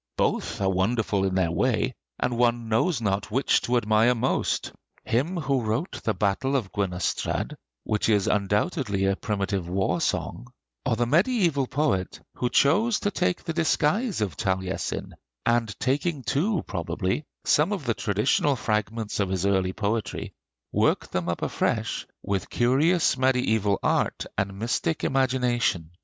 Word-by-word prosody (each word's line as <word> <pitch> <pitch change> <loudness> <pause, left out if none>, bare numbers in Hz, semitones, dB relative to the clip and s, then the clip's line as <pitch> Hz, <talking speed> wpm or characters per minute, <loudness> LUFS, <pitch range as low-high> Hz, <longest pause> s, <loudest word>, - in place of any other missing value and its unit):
Both - - 0
are 95 - +2
wonderful 100 +1 +1
in 95 -1 -1
their 90 -3 +2
way, 125 +7 +1 0.3
and 125 -1 0
one 120 -1 +1
knows 120 +6 +1
not 100 -1 -1
which 130 +6 +2
to 125 +1 +1
admire 110 +2 +3
most 115 - 0 0.3
him 145 +11 0
who 140 -5 0
wrote 115 - -2
the 110 - 0
'Battle 110 +7 0
of 110 -9 -1
Gwenystrad,' 90 -3 -1 0.3
which 105 +1 0
is 105 -3 +3
undoubtedly 105 - 0
a 95 0 +2
primitive 100 -6 -2
war 95 +1 0
song, - - -2 0.4
or - - +2
the 120 - +1
mediæval 165 - +2
poet 130 -10 0
who 125 - -1
chose 205 - +3
to 205 - 0
take 90 - 0
the 165 - -3
disguise 170 - +1
of 95 -8 -1
Taliesin, 95 0 -2 0.3
and 115 -4 +1
taking 145 +2 0
too, 175 - 0
probably, 90 - -2 0.2
some 155 +7 +3
of 190 -9 -3
the 115 - +1
traditional 105 +8 +1
fragments 105 -1 -2
of 100 -2 +1
his 95 0 -1
early 95 -2 +2
poetry, 110 +2 -2 0.4
worked - - +1
them 90 -1 -1
up 85 - -2
afresh - - -1 0.2
with 100 -2 -2
curious 140 +7 +3
mediæval 110 -6 +2
art - - +1
and 95 0 -2
mystic 120 +9 -1
imagination. 125 -10 +1
115 Hz, 145 wpm, -26 LUFS, 100-135 Hz, 0.4 s, admire